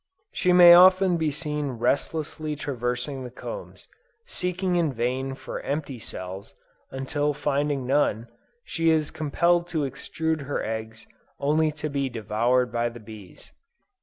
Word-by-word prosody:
She 180 - +1
may 175 -1 +9
often 185 0 +6
be 160 -2 0
seen 150 -2 -2
restlessly 150 +5 -2
traversing 130 -1 -3
the 125 - -6
combs, - - -9 0.4
seeking 180 - -2
in 165 -4 +2
vain 130 +2 -2
for - - -7
empty 140 -3 -4
cells, 95 -1 -7 0.3
until 145 +2 -1
finding 145 -2 -1
none, 125 -4 +1 0.4
she 165 -1 0
is 155 -2 +2
compelled 170 +3 +1
to 160 -3 -1
extrude 160 +2 -3
her 145 - -2
eggs 110 0 -5 0.3
only 155 +2 +2
to 150 0 -4
be 140 -2 -2
devoured 120 +2 0
by 120 0 0
the 120 0 -11
bees. 110 -4 -13
145 Hz, 135 wpm, -25 LUFS, 125-160 Hz, 0.4 s, may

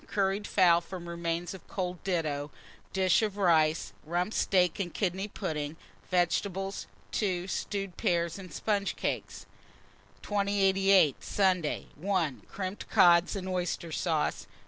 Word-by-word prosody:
Curried 200 0 0
fowl, 175 -3 +5
from 175 0 -8
remains 170 +1 -3
of 190 - -12
cold 180 -2 -4
ditto; 155 -6 -1 0.4
dish 190 +1 +3
of 210 -2 -1
rice, 160 -4 +3
Rump 175 +6 -1
steak 180 -2 +2
and 180 -3 -2
kidney 190 +1 -1
pudding, 150 -5 -4 0.3
vegetables. 190 +2 0 0.2
2. 185 -4 -1
Stewed 195 -1 -3
pears 170 +1 0
and 185 -3 -10
sponge 200 +3 -1
cakes. - - -3 0.8
2088. 195 -5 +3
Sunday. 185 -6 +1
1. 170 -5 -1
Crimped 190 0 -5
cod 175 -2 +5
and 190 -1 -4
oyster 180 -2 -2
sauce. 155 -2 -1
180 Hz, 125 wpm, -30 LUFS, 170-195 Hz, 0.8 s, fowl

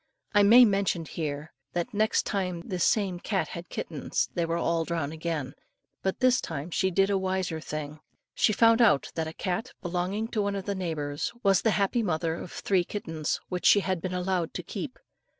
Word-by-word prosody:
I 205 - +6
may 235 +5 +8
mention 195 -5 +1
here, 150 -1 -4 0.2
that 175 +3 -2
next 215 +1 +2
time 180 -4 -2
this 180 0 -2
same 195 -5 +2
cat 195 +1 -1
had 170 0 -8
kittens 155 -4 -2
they 170 -1 0
were 165 +1 0
all 170 -1 +1
drowned 160 -3 -2
again; 160 -4 -3 0.5
but 190 +5 -2
this 255 0 +4
time 160 +1 -5
she 190 +3 +1
did 195 +2 +2
a 195 - +2
wiser 185 -3 -1
thing. 155 0 -5 0.3
She - - +3
found 230 +2 +5
out 210 -12 +4
that 160 -1 -2
a - - -4
cat, 205 +9 -3
belonging 185 +5 -2
to 220 - -1
one 200 0 -1
of 195 -1 -4
the 200 - -1
neighbours, 155 -6 -3
was 195 -2 +4
the 225 - +2
happy 205 +4 +1
mother 165 -5 0
of 170 +1 -7
three 190 -3 +1
kittens 160 -5 -3
which 180 -1 0
she 205 - +7
had 185 -3 -1
been 185 - -3
allowed 180 -2 -1
to - - -3
keep. - - -6
180 Hz, 200 wpm, -28 LUFS, 165-200 Hz, 0.5 s, may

